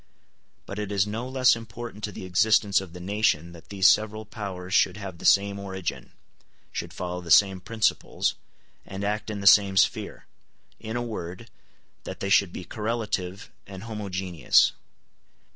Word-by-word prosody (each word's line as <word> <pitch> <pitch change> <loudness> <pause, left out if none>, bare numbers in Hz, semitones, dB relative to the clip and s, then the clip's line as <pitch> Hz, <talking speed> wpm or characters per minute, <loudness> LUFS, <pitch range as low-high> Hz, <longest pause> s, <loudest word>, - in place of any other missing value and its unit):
But 100 - -6
it 105 -1 -4
is 100 -1 +2
no 115 +4 -4
less 130 -2 +4
important 115 -1 -9
to 105 - -6
the 95 - -8
existence 100 +2 +3
of 95 -3 -10
the 90 - -9
nation 90 -4 0
that 85 -1 -15
these 95 -2 +3
several 110 0 +2
powers 95 -4 -7
should 95 -1 +3
have 95 -4 -8
the - - -9
same 100 0 +4
origin, 95 -9 -5 0.6
should - - -5
follow 90 0 -5
the 85 - -10
same 95 +2 +5
principles, 110 +4 0 0.5
and 95 +1 -7
act 105 +1 -2
in 105 -2 -4
the - - -6
same 100 -1 +6
sphere; - - +1 0.5
in 110 0 -6
a 120 - -1
word, 105 -1 -7 0.5
that - - -7
they 100 - -3
should 95 -2 +4
be 90 - -7
correlative 105 -4 -3 0.2
and 95 0 -9
homogeneous. 95 -7 +1
100 Hz, 160 wpm, -26 LUFS, 90-110 Hz, 0.6 s, same